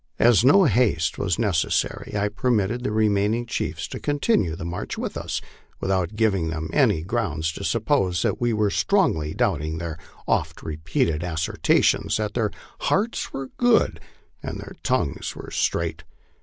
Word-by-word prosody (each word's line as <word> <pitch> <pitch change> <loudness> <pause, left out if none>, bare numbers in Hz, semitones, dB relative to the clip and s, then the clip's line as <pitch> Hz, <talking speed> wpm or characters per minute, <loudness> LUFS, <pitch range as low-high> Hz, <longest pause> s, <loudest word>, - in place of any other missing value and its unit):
As 115 -3 +5
no 190 +10 +7
haste 105 - +2
was 90 -3 0
necessary, 105 -1 0
I 100 0 +1
permitted 115 +1 0
the 125 - -1
remaining 105 +2 +2
chiefs 115 - -3
to - - -6
continue 145 - +1
the 85 -1 -6
march 85 +1 -4
with - - -4
us, - - -3 0.4
without 95 0 -1
giving 100 -7 +1
them 80 0 -4
any 80 - +3
grounds 85 -7 -1
to - - -8
suppose 90 -2 +1
that - - -1
we 120 - +2 0.2
strongly 165 - +1
doubted 80 +2 0
their 80 -2 -5 0.3
oft - - 0
repeated 80 0 -1
assertions 85 -2 +1
that 105 -1 -2
their 115 -3 +1 0.3
hearts 220 +4 0
were 135 -1 -6
good 245 -2 +3 0.4
and - - -5
their - - -9
tongues - - -1
were - - -9
straight. 80 0 -1
100 Hz, 150 wpm, -24 LUFS, 80-120 Hz, 0.4 s, no